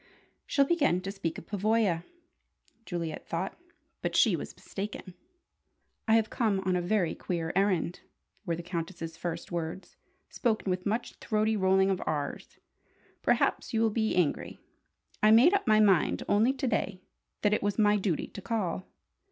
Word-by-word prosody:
"She'll 280 - +3
begin 285 - +2
to 195 +1 -4
speak 190 -5 -4
of - - -9
Pavoya," 205 -3 +1 0.8
Juliet 170 -4 -4
thought. 175 +3 -3 0.5
But - - -2
she - - +5
was - - -7
mistaken. 195 -2 -7 0.9
"I 220 - +5
have 225 -1 +2
come 215 -5 +1
on 185 -1 0
a 180 - +1
very 175 -2 +1
queer 165 -2 -3
errand," 190 -3 +1 0.4
were 170 -5 -1
the 170 - -7
Countess's 165 -1 -5
first 170 0 -5
words, 170 +2 -5 0.3
spoken 220 -5 -1
with 180 +1 -2
much 225 +4 -2
throaty 215 0 0
rolling 190 0 +3
of 190 - -1
"rs". 145 -2 -3 0.6
"Perhaps - - +1
you 225 - +2
will 225 -1 +3
be 220 0 0
angry. 175 -5 0 0.6
I 215 - +6
made 240 - +7
up 400 -8 +1
my 215 -1 +5
mind 195 -6 +3
only 225 +6 +3
to 275 0 -3
day 190 -6 -1 0.4
that 210 0 +3
it - - +1
was 205 0 -1
my 210 -1 +4
duty 190 -6 -1
to 200 - -10
call." 190 -4 -2
195 Hz, 160 wpm, -29 LUFS, 175-220 Hz, 0.9 s, made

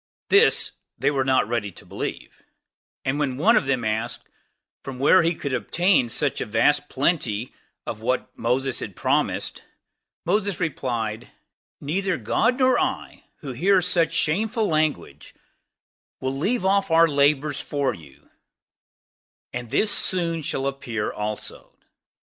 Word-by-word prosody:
This 425 +3 +4 0.3
they - - +1
were 135 -2 +1
not 130 0 +3
to 105 -6 -3
believe; - - -6 0.6
and 135 +2 0
when 130 -4 -1
one 220 - +4
of 150 - +2
them 130 -4 0
asked, 110 +3 -2 0.6
whence 135 +7 +3
he 170 - +1
could 140 -4 -4
obtain 175 -2 +2
such 140 +4 0
vast 145 +7 +2
plenty 130 -6 -1 0.3
of 110 - -5
what 125 +3 -1
he 130 +2 -1
promised, - - -1 0.6
he 200 +3 +1
replied, 120 -8 -3 0.5
"Neither 185 +5 -1
God 250 +1 +1
nor 255 -2 +3
I, - - -3 0.2
we 135 -3 -5
hear 190 +8 +4
such 170 -2 +2
opprobrious 210 +9 -1
language 155 -8 -1
from - - -36 0.9
will - - -5
leave 190 - 0
off 195 0 +2
our 165 +1 +6
labors 145 0 +2
for 140 -2 -1
you; 70 -5 -16 1.2
and 125 -1 -5
this 210 - +2
soon 170 -5 0 0.2
appear 125 -6 -3
also." 105 0 -6
145 Hz, 125 wpm, -24 LUFS, 125-180 Hz, 1.2 s, our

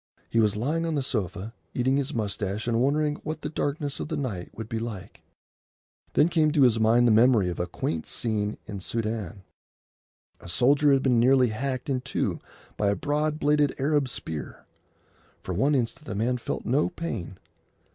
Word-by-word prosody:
He 115 - +2
was 105 -2 +3
lying 150 +10 -1
on 160 - -1
the 140 - 0
sofa, 105 -3 -3 0.2
eating 130 +2 +2
his 140 -1 -1
moustache 105 -2 -2
and 115 0 +2
wondering 150 +2 +1
what 155 0 -6
the 150 - -3
darkness 145 -1 -2
of - - -3
the 155 -1 -3
night 105 -11 -4
would 110 -1 -5
be 115 0 -3
like. 105 -4 -7 0.9
Then 150 - +5
came 160 -3 +2
to 145 -4 +5
his 115 -3 +4
mind 115 +2 +4
the 120 - +5
memory 110 -4 +5
of 90 - -5
a 90 - -1
quaint 80 -2 -3
scene 105 -2 -1
in 105 -2 -6
the - - -8
Soudan. 110 -4 -3 1.0
A - - -11
soldier 140 +9 +4
had 135 -1 +3
been 125 -3 +3
nearly 125 0 +5
hacked 130 +3 -3
in 130 -3 0
two - - -2 0.4
by 100 - +2
a 100 - +2
broad 150 +3 0
bladed 150 -1 +2
Arab 140 -1 +1
spear. 80 -9 -6 0.8
For 95 - -4
one 135 +11 +2
instant 130 +4 -2
the 105 - -4
man 120 +4 0
felt - - -4
no 140 +7 +2
pain. 115 - -5
120 Hz, 185 wpm, -26 LUFS, 105-145 Hz, 1.0 s, Then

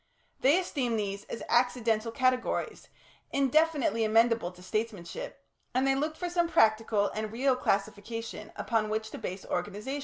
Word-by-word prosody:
They 285 +6 +5
esteemed 260 -10 -1
these 200 -1 -3
as - - -6
accidental 235 -2 +2
categories, 255 +1 0 0.4
indefinitely 280 -3 +2
amenable 225 -3 +3
to 180 0 -15
statesmanship, 215 - -4 0.3
and 260 +1 +3
they 270 - +4
looked 305 +3 -1
for 355 - -3
some 345 -1 +1
practical 215 -5 +3
and 215 0 -4
real 260 +3 +2
classification 215 +1 -2
upon 220 -2 0
which 220 0 -2
to - - -7
base 185 +1 -5
organisation. 205 +10 -3
230 Hz, 145 wpm, -29 LUFS, 215-270 Hz, 0.4 s, They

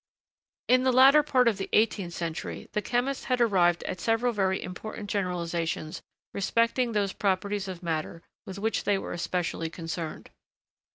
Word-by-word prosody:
] - - -70
In 255 - +5
the 260 0 +3
latter 270 +4 +7
part 260 -4 +2
of 215 -4 +2
the 195 - -4
eighteenth 205 -5 +2
century, 170 0 -5
the 210 - -1
chemists 250 +6 -1
had 255 -1 0
arrived 180 -7 +3
at 180 - -4
several 235 +1 +1
very 190 -2 +1
important 205 +3 -7
generalisations 170 -4 -2 0.3
respecting 230 +4 +1
those 200 -2 0
properties 200 0 -1
of 185 -1 -7
matter 165 0 -3 0.2
with 190 - -7
which 220 +3 -1
they 205 -1 +3
were - - -5
especially 175 -1 -2
concerned. 165 -1 -6
200 Hz, 160 wpm, -28 LUFS, 175-230 Hz, 0.3 s, latter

